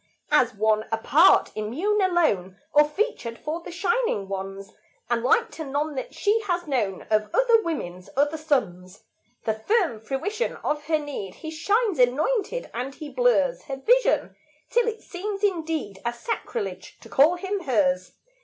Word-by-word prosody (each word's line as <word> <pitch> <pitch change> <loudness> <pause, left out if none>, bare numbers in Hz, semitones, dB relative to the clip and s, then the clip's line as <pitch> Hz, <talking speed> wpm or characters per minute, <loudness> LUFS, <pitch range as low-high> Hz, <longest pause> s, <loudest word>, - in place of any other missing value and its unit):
As 250 -6 +3
one 215 +1 +2
apart, 280 +10 +4
immune, 320 - 0
alone, 310 - +1 0.2
Or 295 0 +5
featured 300 - -2
for 315 +3 -4
the - - -9
shining 370 - 0
ones, 195 +1 -6 0.4
And 235 -1 +2
like 455 - +2
to 320 - -6
none 295 +2 -2
that 260 - -6
she 430 +2 +2
has 350 -1 0
known 225 - -1
Of 215 0 +2
other 470 -2 +5
women's 185 - -5
other 290 +2 +2
sons, 210 - -2 0.4
The 220 - +1
firm 225 - 0
fruition 405 - -2
of 295 0 -1
her 315 0 +2
need, 285 -11 -6
He 315 - -4
shines 405 - +1
anointed; 380 - +1
and 255 +4 -4
he 305 -2 -8
blurs - - +2
Her 275 -3 -4
vision, - - +2 0.4
till 485 -1 +3
it 450 -1 -3
seems 395 +2 -5
indeed 320 - -1
A 235 0 -1
sacrilege 455 - -5
to - - -13
call 305 +6 +4
him 390 +3 -3
hers. 185 -8 +1
300 Hz, 155 wpm, -25 LUFS, -, 0.4 s, Or